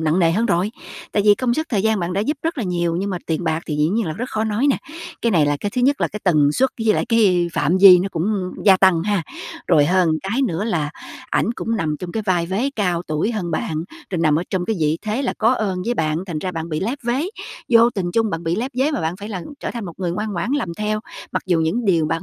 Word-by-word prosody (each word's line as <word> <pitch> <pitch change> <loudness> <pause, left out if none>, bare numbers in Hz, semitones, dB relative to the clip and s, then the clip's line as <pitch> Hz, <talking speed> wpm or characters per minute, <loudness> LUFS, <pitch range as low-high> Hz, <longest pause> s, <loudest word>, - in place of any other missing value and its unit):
nặng 160 +2 +1
nề 165 -2 +3
hơn 225 +5 +1
rồi. 180 +3 +1 0.4
Tại 205 - +2
vì 205 0 +6
công 240 +1 0
sức, 315 +1 -2
thời 205 -4 +1
gian 220 -2 +1
bạn 175 +1 -2
đã 195 - 0
giúp 290 +8 -1
rất 325 -3 -2
là 230 - -1
nhiều, 175 -2 -1
nhưng 200 +2 -2
mà 180 - -2
tiền 165 +2 -1
bạc 160 +1 0
thì 150 - -2
dĩ 150 +1 +2
nhiên 215 0 0
là 155 - -2
rất 245 +9 -5
khó 220 0 -1
nói 220 +6 0
nè. - - +2 0.5
Cái 230 - +2
này 155 -4 +4
là 145 0 +1
cái 205 - -2
thứ 250 - +1
nhất, 280 +2 +2
là - - +1
cái 210 - -7
tần 150 -5 +4
suất 265 +6 +2
với 215 - +4
lại - - 0
cái 190 -7 +3
phạm 175 +5 +1
vi 185 -3 +10
nó 190 +2 -1
cũng 165 -2 -2 0.4
gia 195 -2 +7
tăng, 185 -3 +4
ha. 205 -2 0 0.4
Rồi 155 -5 +5
hơn 185 -1 +3
cái 225 +8 -1
nữa 200 -4 -1
là, 160 -9 -1 0.4
ảnh 230 - +1
cũng 230 -1 -2
nằm 155 -5 -1
trong 180 -1 -6
cái 220 - -2
vai 180 -4 +1
vế 220 +10 -1
cao 180 -4 0
tuổi 155 +9 -1
hơn 180 -6 -3
bạn, 160 +1 -2 0.3
rồi 180 - -2
nằm 155 -2 +3
ở - - -1
trong 185 -2 -1
cái 220 +1 -1
vị 155 +1 +1
thế 220 +5 -2
là 260 - -1
có 225 +3 +4
ơn 190 -6 -2
với 240 - 0
bạn 155 -3 0
thành 165 -4 -3
ra 185 +2 -4
bạn 165 0 -4
bị 155 -1 -2
lép 240 +8 -2
vế, 240 +4 0 0.5
vô 235 0 +6
tình 190 -6 -3
chung 225 -2 +1
bạn 165 0 -3
bị 165 +3 0
lép 250 +4 -2
vế 275 +4 +3
mà 290 - -2
bạn 160 +3 -2
phải 205 +2 -8
là 190 -5 -5 0.2
trở - - -3
thành 235 -4 -5
một 175 - -6
người 180 -2 -1
ngoan 210 +2 -3
ngoãn 175 +7 -2
làm 285 -11 0
theo 215 +1 -2 0.3
mặc - - -1
dù 175 -3 +2
những 185 +10 0
điều 165 -5 +2
bạn 165 +2 -2
190 Hz, 285 wpm, -21 LUFS, 165-225 Hz, 0.5 s, vi